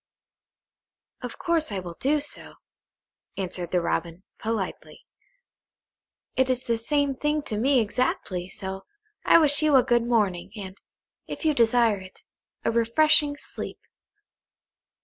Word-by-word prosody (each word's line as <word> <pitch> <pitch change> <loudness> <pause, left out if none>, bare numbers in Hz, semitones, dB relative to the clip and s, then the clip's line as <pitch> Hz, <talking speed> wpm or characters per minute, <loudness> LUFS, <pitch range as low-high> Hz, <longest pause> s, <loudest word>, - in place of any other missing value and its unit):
"Of 245 -2 -7
course 330 -6 0
I 200 - -2
will 180 -2 -6
do 295 +3 +2
so," 290 - -6 0.8
answered 180 -2 -4
the 180 0 +1
Robin, 170 +1 -2 0.2
politely. 220 -4 -4 1.3
"It 260 0 +2
is 255 -1 0
the 235 - 0
same 280 +5 0
thing 295 +3 -1
to 220 - -4
me 265 +3 +4
exactly, 205 -5 -1
so 190 +1 -6 0.4
I - - +7
wish 300 -2 +4
you 305 -2 +4
a 260 - +7
good 240 -1 +3
morning, 200 -5 0
and, 195 -2 -8 0.5
if - - -6
you 310 - +4
desire 230 -4 +3
it, 185 0 -14 0.4
a - - +3
refreshing 290 +6 +3
sleep." - - -8
235 Hz, 130 wpm, -26 LUFS, 190-285 Hz, 1.3 s, I